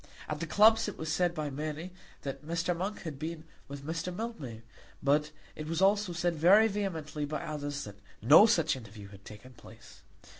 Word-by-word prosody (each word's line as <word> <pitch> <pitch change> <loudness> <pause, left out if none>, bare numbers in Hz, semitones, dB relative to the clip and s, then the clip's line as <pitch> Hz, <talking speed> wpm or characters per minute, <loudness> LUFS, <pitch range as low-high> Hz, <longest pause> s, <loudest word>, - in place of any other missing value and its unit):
At 150 -1 -4
the 170 - -4
clubs 220 +7 +5
it 210 - -6
was 160 -1 -3
said 175 +1 +1
by 150 -2 -3
many 155 +5 -5 0.3
that 135 +1 -5
Mr. 170 +2 -1
Monk 195 +5 -4
had 155 -6 -6
been 160 +1 -5 0.2
with 140 0 -8
Mr. 165 +3 -3
Mildmay; 165 - -6 0.4
but 150 +2 +2 0.3
it 155 - -7
was 165 +1 -2
also 200 0 +3
said 175 0 0
very 190 +8 +6
vehemently 170 -8 -3
by 150 +1 -3
others 145 -1 -4
that 100 -1 -10 0.2
no 150 - +8
such 165 -10 +2
interview 105 -4 -11
had 100 -1 -14
taken 115 +5 -12
place. - - -15
155 Hz, 185 wpm, -30 LUFS, 145-180 Hz, 0.4 s, no